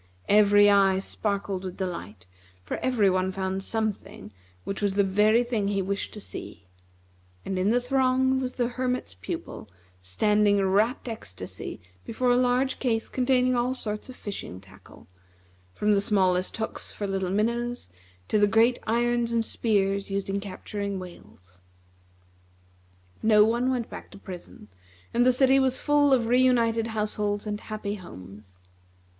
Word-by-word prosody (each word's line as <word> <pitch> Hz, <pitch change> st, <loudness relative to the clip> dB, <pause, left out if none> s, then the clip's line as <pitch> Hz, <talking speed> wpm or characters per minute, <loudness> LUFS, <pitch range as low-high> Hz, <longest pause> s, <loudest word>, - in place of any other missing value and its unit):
Every 205 Hz, 0 st, +6 dB
eye 195 Hz, -2 st, +4 dB
sparkled 200 Hz, -1 st, -3 dB
with 185 Hz, -1 st, -6 dB
delight, 110 Hz, -, -6 dB, 0.4 s
for 90 Hz, -, -4 dB
every 245 Hz, -6 st, +2 dB
one 185 Hz, 0 st, +1 dB
found 190 Hz, 0 st, -3 dB
something 215 Hz, -, -4 dB, 0.3 s
which 195 Hz, -, -4 dB
was 200 Hz, -2 st, 0 dB
the 200 Hz, -, +4 dB
very 210 Hz, +4 st, +3 dB
thing 230 Hz, -4 st, -1 dB
he 200 Hz, -1 st, 0 dB
wished 200 Hz, +2 st, -3 dB
to -, -, -7 dB
see; 100 Hz, -, -9 dB, 0.8 s
and 190 Hz, -1 st, -2 dB
in 190 Hz, +2 st, +2 dB
the 240 Hz, +2 st, +3 dB
throng 260 Hz, +1 st, +2 dB
was 255 Hz, -1 st, -3 dB
the 240 Hz, -2 st, 0 dB
Hermit's 250 Hz, -, -3 dB
Pupil, 90 Hz, -, -7 dB, 0.3 s
standing 205 Hz, -, +2 dB
in 195 Hz, -, +2 dB
rapt 215 Hz, +7 st, +1 dB
ecstasy 95 Hz, -, -7 dB, 0.2 s
before 245 Hz, +2 st, 0 dB
a -, -, +4 dB
large 250 Hz, +1 st, +1 dB
case 225 Hz, -4 st, -1 dB
containing 255 Hz, 0 st, +2 dB
all 245 Hz, +2 st, 0 dB
sorts 210 Hz, -1 st, -5 dB
of 255 Hz, -, -9 dB
fishing 200 Hz, -, -7 dB
tackle, 95 Hz, 0 st, -17 dB, 0.7 s
from 210 Hz, 0 st, +2 dB
the 200 Hz, -, +3 dB
smallest 185 Hz, -3 st, +1 dB
hooks 220 Hz, -, -5 dB
for 205 Hz, -, -5 dB
little 195 Hz, -2 st, -2 dB
minnows 235 Hz, -, -1 dB, 0.4 s
to 215 Hz, -, +2 dB
the 205 Hz, -, +5 dB
great 230 Hz, +4 st, +3 dB
irons 240 Hz, +1 st, +1 dB
and 230 Hz, -1 st, +1 dB
spears 200 Hz, -4 st, 0 dB
used 195 Hz, 0 st, -2 dB
in 200 Hz, -, -1 dB
capturing 200 Hz, 0 st, -5 dB
whales. 100 Hz, -, -13 dB, 1.6 s
No 210 Hz, -1 st, +5 dB
one 240 Hz, +3 st, +1 dB
went 245 Hz, -3 st, -1 dB
back -, -, -10 dB
to -, -, -13 dB
prison, 180 Hz, -, -10 dB, 0.5 s
and 245 Hz, +1 st, +3 dB
the -, -, +7 dB
city 265 Hz, +1 st, +4 dB
was 260 Hz, -1 st, +2 dB
full 290 Hz, -1 st, +3 dB
of 250 Hz, -3 st, +3 dB
re 245 Hz, +2 st, +3 dB
united 230 Hz, -3 st, +2 dB
households 210 Hz, -1 st, -2 dB
and 210 Hz, -1 st, -3 dB
happy 215 Hz, -2 st, -5 dB
homes. 95 Hz, -, -12 dB
210 Hz, 155 wpm, -26 LUFS, 195-240 Hz, 1.6 s, the